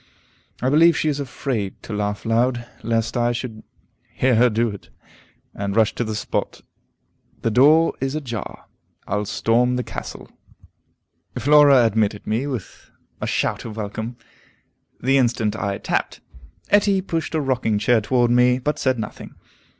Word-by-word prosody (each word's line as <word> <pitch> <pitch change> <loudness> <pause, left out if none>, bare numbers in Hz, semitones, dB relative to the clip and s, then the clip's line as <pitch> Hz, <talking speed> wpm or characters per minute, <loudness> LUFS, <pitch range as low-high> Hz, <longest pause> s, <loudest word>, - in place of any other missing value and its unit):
I 130 - +2
believe 165 +2 +5
she 155 - +1
is 145 -1 -2
afraid 120 -6 -3
to - - -7
laugh 105 0 -3
loud, 120 +1 +1 0.2
lest 115 +1 -1
I 120 -1 +2
should 115 -2 -6 0.5
hear 130 0 +1
her 120 +2 +5
do 115 +2 +1
it, 100 -2 -10 0.6
and 100 0 -4
rush 110 -2 +3
to - - -2
the 110 -1 -4
spot. - - -3 0.8
The 115 - +1
door 150 +8 +5
is 135 +2 -1
ajar; 120 -8 -6 0.4
I'll 105 +1 -2
storm 120 +4 +1
the 125 - -1
castle. - - -8 1.1
Flora 145 -3 +6
admitted 105 -2 0
me 115 +6 -1
with 125 -8 -7 0.3
a - - -2
shout - - -1
of 110 -1 -8
welcome, 110 +3 -5 0.8
the 135 +2 +2
instant 115 -4 +1
I 100 -2 -2
tapped. - - -2 0.5
Etty 200 -1 +3
pushed 165 -3 -3
a - - +2
rocking 125 -6 0
chair 115 +2 +2
toward 120 +2 +2
me, 125 +1 +4
but 150 +4 -2
said 130 -2 +1
nothing. 110 -1 -7
120 Hz, 150 wpm, -22 LUFS, 110-135 Hz, 1.1 s, Flora